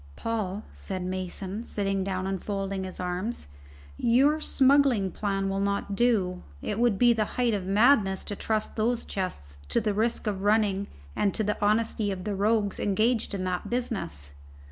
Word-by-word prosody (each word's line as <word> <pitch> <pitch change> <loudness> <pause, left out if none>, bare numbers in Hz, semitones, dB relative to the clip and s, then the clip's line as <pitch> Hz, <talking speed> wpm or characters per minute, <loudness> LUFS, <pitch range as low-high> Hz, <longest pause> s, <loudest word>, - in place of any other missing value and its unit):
"Paul," 215 -3 -2
said 185 -2 -5
Mason, 185 +3 -4
sitting 195 -4 -1
down 185 -1 -2
and 190 -2 -2
folding 195 -2 -3
his 185 - -7
arms, 180 - -3 0.5
"your 275 +6 +4
smuggling 270 -9 +3
plan 195 -1 -1
will 195 0 -1
not 200 0 -1
do. 195 -6 +2 0.2
It 210 - -3
would 235 -4 +3
be 240 +1 +6
the 220 -2 +1
height 245 -2 +2
of 190 -3 -2
madness 205 -2 +4
to 205 - -5
trust 215 +1 -2
those 230 +2 0
chests 70 - -5
to - - +3
the 210 -2 0
risks 225 +4 0
of 200 -3 -2
running 205 -1 +2 0.3
and 200 - +1
to 220 - +1
the 210 0 -1
honesty 215 0 +2
of 185 -1 -5
the 210 - -2
rogues 205 0 +1
engaged 215 +2 +1
in 185 - -3
that 180 -1 -2
business." 195 - -2
205 Hz, 170 wpm, -27 LUFS, 190-225 Hz, 0.5 s, be